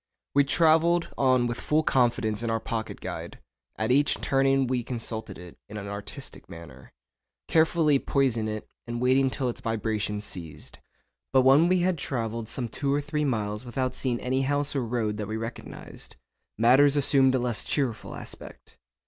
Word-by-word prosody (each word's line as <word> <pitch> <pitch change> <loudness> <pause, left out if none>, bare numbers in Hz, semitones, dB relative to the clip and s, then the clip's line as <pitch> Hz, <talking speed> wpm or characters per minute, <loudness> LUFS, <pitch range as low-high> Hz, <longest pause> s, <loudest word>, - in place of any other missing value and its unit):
We 140 0 +4
travelled 165 +3 +3
on 130 -2 +3
with 120 0 -3
full 155 +1 +1
confidence 120 -5 +1
in 115 - -2
our 115 0 0
pocket 110 0 -5
guide; - - -6 0.4
at 110 +2 0
each 140 +2 +3
turning 135 0 +2
we 125 -1 0
consulted 115 -2 -6
it 90 -1 -12
in 105 - -7
an 100 -1 -6
artistic 100 +6 -8
manner, 75 -7 -12 0.6
carefully 160 -3 +3
poising 125 -7 0
it 110 0 -5 0.2
and 120 0 -3
waiting 130 +2 +3
till 130 0 -2
its 125 +1 -4
vibrations 110 -3 -2
ceased. 80 -5 -7 0.5
But 130 -1 +4
when 140 +6 +6
we 180 0 +3
had 180 -2 +1
travelled 115 -4 -3
some 120 +1 -3
two 140 +5 -2
or 145 - +2
three 150 +1 -2
miles 105 -4 -2
without 130 +1 -2
seeing 125 -3 -1
any 130 +1 0
house 145 +2 0
or 135 - 0
road 110 -3 -2
that 105 -1 -4
we 110 +1 -3
recognised, 115 +1 -8 0.4
matters 135 +6 +5
assumed 135 -2 +4
a - - +3
less 120 -3 -1
cheerful 130 -6 -2
aspect. - - -11
125 Hz, 170 wpm, -27 LUFS, 110-140 Hz, 0.6 s, when